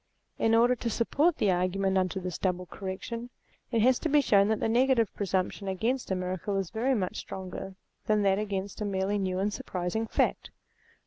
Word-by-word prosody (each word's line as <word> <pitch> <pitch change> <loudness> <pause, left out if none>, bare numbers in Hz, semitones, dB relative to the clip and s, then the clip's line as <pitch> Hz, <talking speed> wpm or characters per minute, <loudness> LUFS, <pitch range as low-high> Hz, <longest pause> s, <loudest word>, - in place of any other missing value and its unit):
In 225 0 +3
order 240 +2 +5
to 230 - -2
support 285 +9 +2
the 200 - +2
argument 185 +2 +1
under 185 0 +1
this 180 -2 -5
double 180 -1 -1
correction, 205 +6 -6 0.4
it 230 -3 +2
has 255 +1 +4
to 320 - -1
be 295 0 +5
shown 200 -7 +4
that 220 0 +1
the - - 0
negative 240 -1 +3
pre 200 - -3
sumption 190 +1 -1
against 240 +7 -1
a 190 - +1
miracle 185 +2 -2
is 195 -3 -2
very 250 +4 +1
much 185 -5 -2
stronger 190 0 -6 0.3
than 215 -1 +3
that 195 0 +3
against 200 -1 -4
a - - 0
merely 200 +1 0
new 185 -1 -1
and 205 +2 0
surprising 185 +6 -3
fact. - - 0
200 Hz, 195 wpm, -29 LUFS, 190-230 Hz, 0.4 s, order